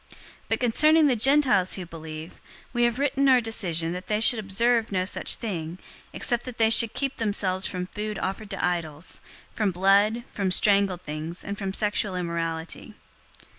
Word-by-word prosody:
021:025 - - -18 0.3
But - - 0
concerning 305 +6 +4
the 270 -4 +3
Gentiles 250 -6 +3
who 185 - -5
believe, 160 0 -9 0.3
we 240 -1 +2
have 240 0 0
written 275 0 +1
our 255 -1 +6
decision 175 -8 0
that 180 +1 -7
they 210 0 0
should 225 +1 +4
observe 225 +3 +1
no 185 -1 0
such 190 - 0
thing, 175 -6 -5 0.3
except 240 -2 -2
that 250 -2 -8
they 225 -1 +3
should 225 -1 +5
keep 275 -1 -2
themselves 195 -4 -1
from 180 -1 -4
food 210 +2 -5
offered 200 +2 -4
to 195 -3 -2
idols, 170 -3 -4 0.3
from 215 -3 0
blood, 200 +5 +2
from 195 -2 -1
strangled 195 -1 +2
things, 155 +3 -6
and 200 - -4
from 195 -2 -4
sexual 205 -1 -1
immorality." 170 +3 -4
200 Hz, 170 wpm, -25 LUFS, 180-230 Hz, 0.3 s, our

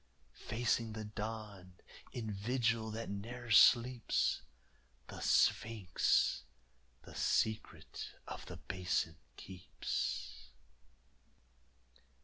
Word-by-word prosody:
Facing 115 -1 0
the 110 0 -5
dawn, 105 -3 -6 0.4
in 110 -3 -4
vigil 115 +2 0
that 115 +1 -5
ne'er 120 +4 -6
sleeps, 120 +3 +5 0.7
The - - -7
sphinx 110 -5 +2 0.6
the - - -12
secret 110 -8 -1 0.2
of - - -7
the - - -7
Basin 90 -3 -2 0.2
keeps. 65 -8 -4
110 Hz, 80 wpm, -35 LUFS, 95-115 Hz, 0.7 s, sleeps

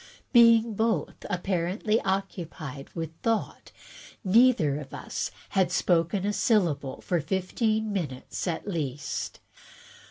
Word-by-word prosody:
Being 230 -2 +6
both, 225 +2 -1
apparently, 190 +4 0
occupied 170 -7 -4
with 165 -2 -3
thought, 225 -1 -1 0.5
neither 195 - +4
of 135 -3 -8
us - - -4 0.2
had 185 -2 +2
spoken 180 +2 +1
a 205 - 0
syllable 160 - +1
for 175 -3 0
fifteen 215 - 0
minutes 150 -4 -4
at 170 +3 -3
least. 145 -7 -3
185 Hz, 105 wpm, -27 LUFS, 160-215 Hz, 0.5 s, Being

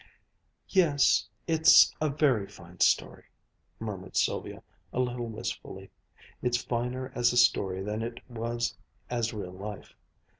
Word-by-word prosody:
"Yes, 160 -8 +3 0.2
it's 160 -1 +6
a 155 - +2
very 135 -8 +2
fine 90 -3 -15
story," - - +2 0.5
murmured 95 -4 -6
Sylvia - - -1 0.3
a - - -3
little 125 -1 -1
wistfully. 110 -1 -6 0.5
"It's 125 -1 +1
finer 125 +2 -3
as 120 0 +2
a - - 0
story 95 -6 +3
than 105 +2 -3
it 115 +1 -6
was 120 0 -3 0.4
as 120 -2 0
real 100 -5 -6
life. 100 +2 -8
120 Hz, 125 wpm, -29 LUFS, 105-125 Hz, 0.5 s, it's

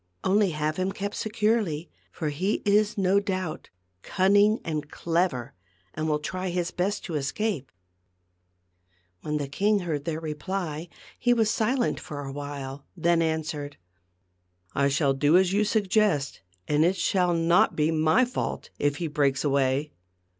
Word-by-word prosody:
Only 200 +1 +3
have 155 -1 -2
him 185 +1 0
kept 200 +1 -4
securely; 210 -7 0 0.2
for 155 -3 -3
he 185 +8 -1
is 210 +1 +3
no 195 0 +3
doubt 185 -5 -4 0.3
cunning 205 - +3
and 150 -3 -3
clever, 165 -9 -1 0.4
and 155 0 -2
will 150 - +2
try 185 +5 -4
his 175 0 -1
best 195 +3 -2
to 175 - -5
escape." 150 - -2 1.5
When 150 0 -2
the 145 -2 -3
king 205 +9 +2
had 185 - -4
heard 145 -3 -2
their 160 -2 -2
reply, 160 +1 -4 0.3
he 245 0 +3
was 220 -2 +2
silent 240 +3 0
for 145 -5 -7
a 135 - -5
while, 140 -1 -6
and 170 - -9
then 170 -1 +4
answered: 155 -3 -2 0.5
" 90 0 -42
I 140 - +4
will 140 -4 +3
do 145 +5 +4
as 190 0 +3
you 210 +1 +3
suggest, 205 -8 +1 0.3
and 150 +1 +3
it 180 +3 +3
shall 180 -3 +1
not 170 +6 +3
be 155 +1 +2
my 160 +9 +3
fault 245 - -4
if 145 0 +1
he 170 - -3
breaks 145 -3 +1
away. 140 +1 +1
165 Hz, 160 wpm, -26 LUFS, 145-195 Hz, 1.5 s, then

